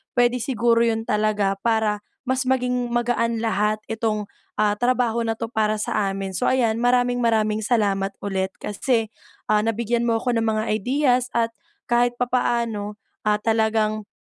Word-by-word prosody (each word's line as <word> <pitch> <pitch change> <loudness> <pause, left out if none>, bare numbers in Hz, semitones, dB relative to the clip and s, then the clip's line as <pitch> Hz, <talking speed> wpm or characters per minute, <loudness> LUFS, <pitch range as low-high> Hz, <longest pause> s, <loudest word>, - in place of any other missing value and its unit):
puwede 245 0 +3
siguro 235 -1 +2
'yon 225 0 0
talaga 210 -2 0
para 220 -2 +1 0.3
mas 260 0 0
maging 250 -1 0
magaan 235 -1 0
lahat 215 -1 +1
itong, 220 -2 -2 0.3
ah, 210 -1 +3
trabaho 240 0 +1
na 225 -1 -1
'to - - -3
para 215 -2 +1
sa 210 -1 0
amin. 195 -1 -4
So 250 - +1
ayan, 235 -3 +1
maraming-maraming 240 -3 +2
salamat 200 -4 0
ulit, 190 -1 -1
kasi, 220 +1 -1 0.3
ah, 210 0 +3
nabigyan 235 +2 0
mo 225 - +2
ako 245 +1 -1
ng 230 - +1
mga 215 0 +1
ideas 250 +2 +1
at 230 0 +1 0.3
kahit 240 0 +2
papaano, 235 -4 -1 0.2
ah, 210 -1 +2
talagang, 220 -1 0
225 Hz, 150 wpm, -23 LUFS, 210-240 Hz, 0.3 s, puwede